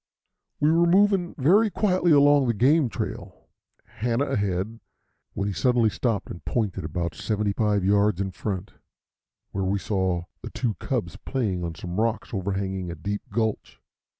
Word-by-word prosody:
We 150 +2 +4
were 170 +1 +4
moving 190 -1 +3
very 195 +11 +4
quietly 185 -4 +1
along 145 -2 +5
the 115 - +1
game 135 +4 +3
trail, - - -6 0.4
Hanna 120 +4 -1
ahead, 100 +1 -2 0.6
when 100 - -1
he 100 - -2
suddenly 120 -1 +2
stopped 110 -5 -2
and 85 - -9
pointed 105 -9 -2
about 85 +1 -3
seventy 105 +5 -1
five 105 -3 +1
yards 100 -1 +3
in 95 -1 -2
front, 95 0 -4 0.8
where 95 - -2
we 95 +2 +1
saw 95 -4 -1 0.2
the - - -7
two 120 -4 -2
cubs 105 -8 -3
playing 105 -7 -2
on 85 -1 -4
some 90 +6 -3
rocks 115 +1 -1
overhanging 95 -2 -2
a 85 - -5
deep 100 +6 -4
gulch. 110 0 -2
105 Hz, 155 wpm, -25 LUFS, 95-130 Hz, 0.8 s, along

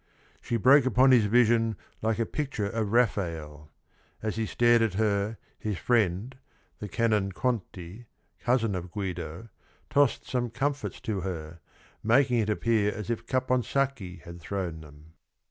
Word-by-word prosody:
She 120 - -1
broke 130 +4 +6
upon 130 +1 +5
his 120 -4 +5
vision 115 -1 +3 0.2
like 110 0 0
a 115 - 0
pic 145 +4 -4
ture 105 - -1
of 105 0 -2
Rafael. 80 -10 -1 0.5
As 110 -2 -2
he 110 -1 -1
stared 120 +1 +4
at 110 -5 +1
her, 105 +1 0 0.2
his 105 -4 -3
friend, 110 - +1 0.4
the 105 - -5
Canon 105 -3 0
Conti, 105 -2 -4 0.3
cousin 120 -4 +1
of 90 -1 -4
Guido, 90 0 -5 0.4
tossed 140 -5 +2
some 120 +1 -1
comfits 140 +4 -2
to 105 -3 -2
her, 85 -2 -6 0.4
making 125 +2 +3
it 110 -1 0
appear 105 -1 +1
as 110 +2 -5
if 115 - -4
Capon 130 -1 +1
sacchi 125 -7 -2
had 85 0 -10
thrown 85 -3 -4
them. 75 +1 -16
110 Hz, 150 wpm, -28 LUFS, 95-120 Hz, 0.5 s, broke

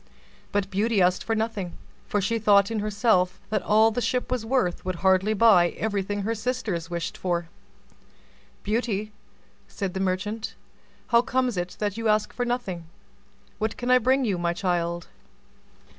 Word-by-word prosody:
But 200 -1 -1
Beauty 210 +2 +1
asked 180 0 +3
for 225 - -1
nothing; 220 -5 -2 0.3
for 205 - 0
she 230 +4 0
thought 200 -1 +4
in 225 - -1
herself 205 -3 +1
that 210 -2 +1
all 220 +2 +4
the 245 - -2
Ship 250 +1 -1
was 250 -3 0
worth 225 -7 0
would 185 0 -2
hardly 190 +3 +4
buy 195 -5 +6
everything 205 -1 -2
her 225 +3 0
sisters 215 -7 -3
wished 170 -1 -3
for. 175 -2 -2 1.1
"Beauty," 215 -1 -1 0.6
said 195 -3 -4
the 190 - -3
merchant, 200 +4 -2 0.5
"how 235 -1 +5
comes 255 -1 0
it 180 0 -3
that 205 0 -2
you 230 0 -1
ask 215 0 +2
for 245 - -2
nothing: 195 -9 -3 0.7
what 220 0 -2
can 245 +1 -1
I 255 - +7
bring 260 +2 +2
you, 195 -5 0
my 170 0 0
child?" 175 -1 -1
210 Hz, 160 wpm, -25 LUFS, 185-230 Hz, 1.1 s, I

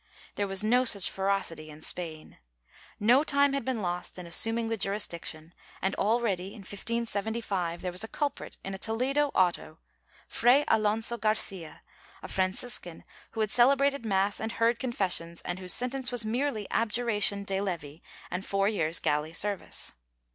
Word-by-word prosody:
^ - - -40 0.3
There 205 - -2
was 195 +1 +1
no 245 +4 +3
such 200 -6 0
ferocity 190 -5 -1
in 155 +1 -12
Spain. 160 -3 -7 0.6
No 245 +7 +5
time 280 -2 +2
had 275 - -1
been 235 -4 -2
lost 175 +1 -3
in 180 - -7
assuming 225 +7 +5
the 225 - -1
jurisdiction 175 -5 -2 0.3
and 190 +1 -1
already, 205 -4 0
in 215 - -10
1575, 205 -3 -3
there 180 - -2
was 180 +4 -4
a - - -4
culprit 290 +3 -4
in 195 - -5
a 190 - -6
Toledo 260 +7 +1
auto— 175 -3 +1 0.5
Fray 255 +5 +4
Alonso 220 +2 +1
Garcia, 200 -6 -1 0.4
a - - -6
Franciscan 185 -1 -2
— - - -22
who 225 - -2
had 215 -1 0
celebrated 275 +2 +3
mass 200 -1 0
and 220 +1 -3
heard 230 +1 +2
confessions, 185 -9 -1
and 175 +1 -4
whose 180 -1 -1
sen 250 0 +4
tence 265 -2 -2
was 240 -3 0
merely 230 -1 -1
abjuration 215 -3 +2
de 195 -1 -1
levi 165 -7 -4 0.3
and 180 +2 -3
four 195 0 +1
years' 165 -6 +1
galley 150 +2 -1
service. 205 +3 -1
205 Hz, 165 wpm, -29 LUFS, 180-235 Hz, 0.6 s, No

